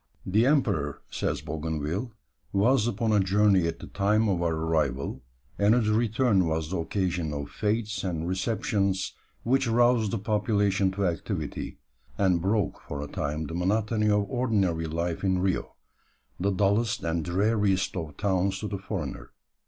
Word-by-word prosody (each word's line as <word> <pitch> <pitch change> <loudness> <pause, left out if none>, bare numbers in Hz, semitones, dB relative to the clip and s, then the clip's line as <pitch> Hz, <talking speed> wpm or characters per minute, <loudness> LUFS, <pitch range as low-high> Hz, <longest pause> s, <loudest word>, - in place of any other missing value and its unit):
"The 110 +6 +3
emperor," 100 - +1
says - - -2
Bougainville, 80 - -3 0.4
"was 110 +4 +3
upon 115 0 0
a 105 - +4
journey 95 -2 +3
at 85 - -3
the - - -9
time 105 +3 +1
of 90 -3 0
our 85 -2 +1
arrival, 80 -4 -1 0.4
and 105 +3 +5
his 115 -3 +2
return 110 -4 +2
was 80 0 -2
the 95 - -1
occasion 90 -2 -1
of 70 -1 -5
fêtes 110 -1 -1
and 85 -3 -2
receptions 95 0 0 0.3
which 135 +2 +2
roused 120 -1 +3
the 115 - -1
population 105 -2 +1
to 100 0 -1
activity, 85 -2 -3 0.4
and 90 -4 +2
broke 100 +2 0
for 70 - -4
a 75 - -4
time 75 +2 -3
the 80 - -6
monotony 105 +4 +1
of 105 -1 +3
ordinary 100 -10 0
life 85 +2 -2
in 95 -1 +2
Rio, 95 0 -1 0.6
that 95 +1 0
dullest 105 +3 +1
and 80 -1 -1
dreariest 100 +2 +1
of 80 -4 -5
towns 95 -1 +1
to 105 - -3
the 100 -2 -4
foreigner. 95 - -5
100 Hz, 155 wpm, -27 LUFS, 85-105 Hz, 0.6 s, and